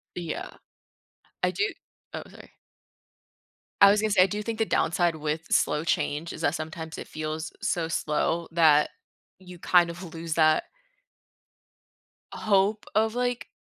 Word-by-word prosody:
Yeah. 170 -3 -5 0.9
I - - +3
do 430 - -1 0.5
oh, - - -5
sorry. - - -15 1.3
I 200 - +10
was 205 +1 +3
gonna 215 0 0
say, 195 -3 +5
I - - +3
do 210 +2 -4
think 225 +1 -4
the 225 - +2
downside 170 -4 +1
with 155 +1 -3
slow 150 +1 +2
change 160 -1 -1
is - - -9
that 145 - +1
sometimes 160 0 -6
it - - -7
feels 155 +1 -5
so 170 -2 0
slow 165 +1 -1
that 155 -3 +5 0.5
you 180 -1 -12
kind 175 0 +4
of 170 0 -9
lose 165 -1 -4
that 155 -1 +4 1.7
hope 205 +1 +1
of, 220 +1 +2
like 245 0 -2
170 Hz, 145 wpm, -26 LUFS, 155-200 Hz, 1.7 s, I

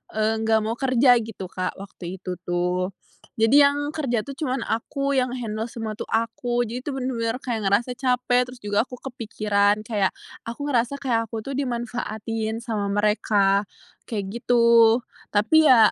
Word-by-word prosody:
eee, 220 +1 +1
nggak 220 0 +3
mau 220 +1 -1
kerja 255 -1 +4
gitu 220 -4 -7
Kak, 185 0 -3
waktu 190 -2 -8
itu 180 -1 -5
tuh. 180 +1 -1 0.4
Jadi, 225 +6 +5
yang 290 +1 +2
kerja 260 -8 -1
tuh 275 -1 -9
cuman 270 -3 -2
aku 275 +5 -2
yang 255 0 +1
handle 220 -2 -3
semua 225 -2 -6
tuh - - -5
aku, 240 +2 0
jadi 240 +2 -5
tuh 285 -2 -3
benar-benar 240 -2 -1
kayak 225 -5 -2
ngerasa 215 +6 +2
capek, 250 -1 +2
terus 250 -1 -11
juga 205 +3 +1
aku 250 - -8
kepikiran 210 -4 0
kayak, 210 -4 0 0.4
aku 235 +5 -5
ngerasa 245 +2 +1
kayak 230 -4 0
aku 220 0 -5
tuh 275 - -6
dimanfaatin 225 -3 -3
sama 215 -4 -2
mereka, 205 -1 +2 0.4
kayak 200 -4 -3
gitu. 235 -1 +5 0.3
Tapi 300 +10 +5
ya, 230 -5 +7
225 Hz, 160 wpm, -24 LUFS, 210-250 Hz, 0.4 s, ya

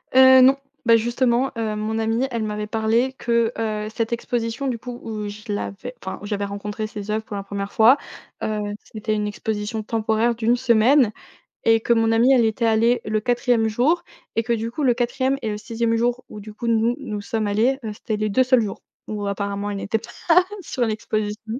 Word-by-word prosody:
Heu, 260 0 +8
non, 265 +1 +7 0.3
beh, 230 -1 +6
justement, 240 +3 +1
heu, 220 -2 -1
mon 215 +1 -2
amie, 225 +4 0
elle 230 -2 -2
m'avait 210 0 -3
parlé 225 +4 +1
que, 235 -3 +1
heu, 215 -1 -2
cette 230 -1 -1
exposition 235 +2 -2
du 245 -3 -2
coup, 245 +1 -7
où 215 -2 -4
je 210 +1 -8
l'avais 205 +4 -4
enfin, 190 - -6
où - - -8
j'avais 205 -1 -2
rencontré 205 +2 -4
ses 210 -1 -6
œuvres 220 +1 -1
pour 215 - -7
la 200 - -4
1re 200 0 -5
fois, 230 +5 +6 0.5
heu, 215 -1 -1 0.2
c'était 215 0 -4
une 210 -1 -1
exposition 210 +1 -3
temporaire 220 +1 +1
d'une 230 +1 +2
semaine 245 0 +4 0.5
Et 225 0 +4
que 235 - +1
mon 225 0 +2
amie 235 +4 +5
elle 250 -3 +5
était 225 +1 +1
allée 230 +2 +3
le 215 0 0
4e 240 -1 +1
jour 255 +11 +2 0.3
et 225 - +3
que 235 +1 -1
du 230 0 -1
coup, 295 - -4
le 255 -3 +4
4e 260 +3 0
et 225 - -2
le 210 - -3
6e 230 +1 -1
jour 245 +2 0
où 210 - -9
du 210 +1 -10
coup 235 - -6
nous, 230 +1 +2
nous 210 -6 -4
sommes 220 0 -2
allées, 225 +6 +2
heu, 215 - -3
c'était 215 +1 -3
les 215 0 -1
2 260 +6 +4
seuls 255 -2 +4
jours 205 -3 -5 0.3
où 210 -1 -3
apparemment 200 0 -2
elle 200 - -3
n'était 215 +3 -1
pas 230 +2 -12 0.5
sur 255 -7 -2
l'exposition. 220 +1 -3
225 Hz, 210 wpm, -22 LUFS, 215-240 Hz, 0.5 s, Heu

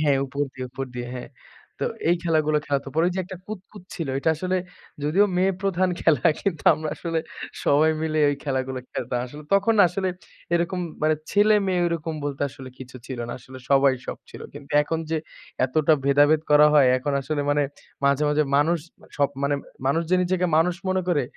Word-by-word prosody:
হ্যাঁ 145 -3 +3
উপর 140 +2 -6
দিয়ে 130 -1 -6
উপর 135 +1 -4
দিয়ে। 120 0 -4
হ্যাঁ। 125 - -7 0.5
তো - - +1 0.2
এই 175 - +4
খেলাগুলো 155 -3 +2
খেলাত। 140 -1 -1
পরে 165 +2 +4
যে - - -3
একটা 185 +1 -8
কুতকুত 205 -1 -9
ছিল। 165 -5 -4
ওইটা 140 +4 +1
আসলে 185 +3 -1 0.5
যদিও 170 +8 +4
মেয়ে 190 +2 +3
প্রধান 185 -1 +1
খেলা 155 -3 +3
কিন্তু 175 -7 -2
আমরা 155 0 -5
আসলে 165 -1 -2 0.5
সবাই 155 +3 +4
মিলে 155 -1 -1
এই 145 - +1
খেলাগুলা 130 -2 -2
খেলতাম। 125 0 -3
আসলে 150 +4 -10
তখন 200 +3 +3
আসলে 190 +2 -2 0.5
এরকম 175 +2 0 0.2
মানে 155 0 +3 0.2
ছেলে-মেয়ে 205 -3 +3
ওরকম 165 -1 -2
বলতে 145 -1 -3
আসলে 130 0 -11
কিছু 130 0 -10
ছিল 130 -2 -6
না। - - -4
আসলে 130 +2 -12
সবাই 135 -1 +5
সব - - -5
ছিল। - - -11
কিন্তু 145 -1 -10
এখন 160 +2 -2
যে 160 - +1 0.5
এতটা 150 +4 +2
ভেদাভেদ 145 +2 +4
করা 150 0 +7
হয় 140 -4 +6
এখন 140 +3 -2
আসলে 145 +2 -2
মানে 145 0 +2 0.4
মাঝে, 140 +1 +3
মাঝে 150 +1 +3
মানুষ 160 +4 +3 0.4
সব 140 -1 +3
মানে 140 +1 +1 0.3
মানুষ 160 +5 +2
যে 185 - +5
নিজেকে 180 0 +1
মানুষ 170 +2 +3
মনে 185 0 +1
করে 155 -6 +2
155 Hz, 185 wpm, -24 LUFS, 140-175 Hz, 0.5 s, করা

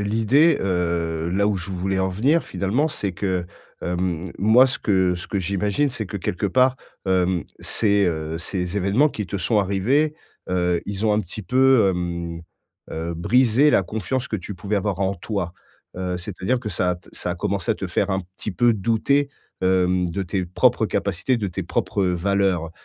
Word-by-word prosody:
l'idée, 115 +10 +3
heu, 85 -3 -1
là, 100 +3 +1
où 105 -2 +1
je 90 +2 -6
voulais 95 +1 -1
en 95 0 +1
venir 135 - +2
finalement, 120 +11 0
c'est 100 - -3
que, 90 -1 -1 0.4
hem, 90 -1 -2
moi, 110 +7 +6
ce 130 - -2
que 95 -4 +2
ce 90 - -7
que 100 - -2
j'imagine, 100 +9 0
c'est 110 -6 -5
que 100 - -5
quelque 90 +2 -2
part, 130 +4 +3 0.3
hem, 90 -2 +1 0.2
ces, 100 -3 +2
heu, 80 -1 -2
ces 90 +2 -3
événements 105 +11 +3
qui 105 - -4
te 100 - -4
sont 105 +4 +1
arrivés, 120 +11 +1 0.3
heu, 90 -1 +1
ils 100 +1 -3
ont 105 - +3
un 105 - +2
petit 105 +2 -7
peu, 130 -4 +4
hem, 85 -2 -3 0.5
heu, 80 +1 -3
brisé 125 - +3
la - - +4
confiance 110 +7 -3
que 110 - -1
tu 95 +2 -7
pouvais 100 +3 -2
avoir 100 -1 -1
en 95 0 +1
toi. 90 -1 -3 0.4
Heu, 90 -1 -3
c'est-à-dire 95 +6 -2
que 110 -4 -5
ça 90 0 0
a - - 0
t 85 - -16
ça 90 - -4
a - - -5
commencé 100 +4 -2
à 110 - +3
te 95 - -5
faire 90 +3 0
un 95 -1 0 0.2
petit 105 - -3
peu 120 +5 +3
douter, 115 +7 +1 0.3
hem, 90 -1 +2
de 95 +4 -2
tes 95 0 -2
propres 110 +5 +2
capacités, 100 +5 0
de 105 -3 -2
tes 90 - -4
propres 100 - -1
valeurs. 90 -2 +1
95 Hz, 190 wpm, -23 LUFS, 90-110 Hz, 0.5 s, moi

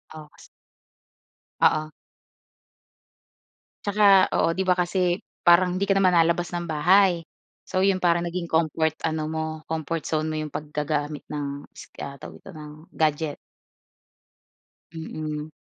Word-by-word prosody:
Oo, 155 -1 -9
kas - - -17 1.1
Oo. 155 0 +3 2.0
Tsaka, 200 -2 +5
oo, 165 - +2
di 190 - -1
ba 180 - +4
kasi 180 0 0 0.2
parang 180 +1 +5
hindi 200 - 0
ka 195 - +3
naman 190 -2 +4
lalabas 170 0 +2
ng 175 -1 -4
bahay, 175 +3 +3 0.4
so 185 - -2
'yon 190 -1 +2
parang 170 0 +2
naging 180 +1 -3
comfort 160 0 +1 0.2
ano 160 -1 -2
mo, 160 0 -2 0.3
comfort 160 0 -2
zone 155 0 -1
mo 155 - -3
yung 155 -1 -4
paggagamit 150 0 -3
ng 145 -1 -4
is - - -12 0.2
ah, 140 0 -8
tawag - - -11
nito - - -11
ng 150 -3 -10 0.2
gadget. 155 -1 0 1.6
Mm. 155 -1 -5
165 Hz, 135 wpm, -24 LUFS, 155-180 Hz, 2.0 s, Tsaka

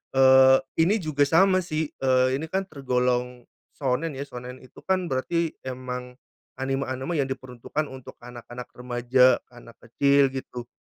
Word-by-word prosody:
eee, 130 0 +7 0.3
ini 210 - +3
juga 145 -2 +1
sama 185 +4 +4
sih, 160 -3 -3
eee, 130 -1 +3
ini 160 - -5
kan 190 +1 0
tergolong 125 -3 -1 0.4
shounen 140 +4 -1
ya, 135 - -6
shounen 125 0 -9
itu 130 - -19
kan 185 -2 0
berarti 165 +5 -1
emang 125 -1 -6 0.5
anime-anime 135 +3 -2
yang 135 - -6
diperuntukkan 130 +4 -4
untuk 130 -1 -10
anak-anak 120 0 -10
remaja, 125 +1 +3
anak 120 -1 -15
kecil 140 +3 +3
gitu. 125 -2 -7
130 Hz, 140 wpm, -25 LUFS, 125-145 Hz, 0.5 s, eee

